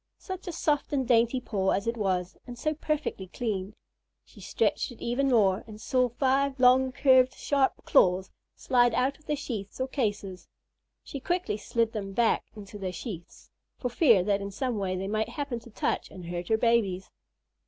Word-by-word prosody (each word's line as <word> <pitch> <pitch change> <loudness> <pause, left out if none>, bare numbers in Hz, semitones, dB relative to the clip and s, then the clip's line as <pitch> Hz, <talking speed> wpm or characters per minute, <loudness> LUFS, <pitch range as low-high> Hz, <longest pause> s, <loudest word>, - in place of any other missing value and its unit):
Such 375 0 -8
a - - -2
soft 300 -3 0
and 265 -3 0
dainty 235 +1 +3
paw 200 -6 -1
as 200 - +1
it 230 +1 -1
was, 185 -4 -1
and 245 -1 -8
so 310 +4 -1
perfectly 300 -10 -3
clean. 205 -1 -4 0.5
She - - -16
stretched - - 0
it 240 - -13
even 260 +4 0
more, 200 -6 +3
and 215 -1 -10
saw 250 +2 +1
five 270 +2 +1
long, 260 +1 +5
curved, 260 -2 +4
sharp 275 -2 0
claws 185 +1 +3 0.2
slide 245 -2 +2
out 270 +3 0
of 305 - -27
their 300 - 0
sheaths 215 -8 -6
or 260 - 0
cases. 205 -8 -3 0.6
She 280 - -7
quickly 350 - -1
slid 230 +1 0
them 200 -3 -5
back 235 +2 +2
into 205 -1 -10
their 190 -2 -3
sheaths, 180 -2 -9 0.3
for 250 - -2
fear 235 - +4
that 200 +1 +1
in 200 - -4
some 240 +2 -2
way 185 -1 -1
they 190 +1 -3
might 215 +2 -1
happen 280 -6 -4
to 235 - -15
touch 215 - -2
and 180 -2 -10
hurt 175 0 -5
her 220 - +3
babies. 220 -6 +1
235 Hz, 185 wpm, -28 LUFS, 195-260 Hz, 0.6 s, long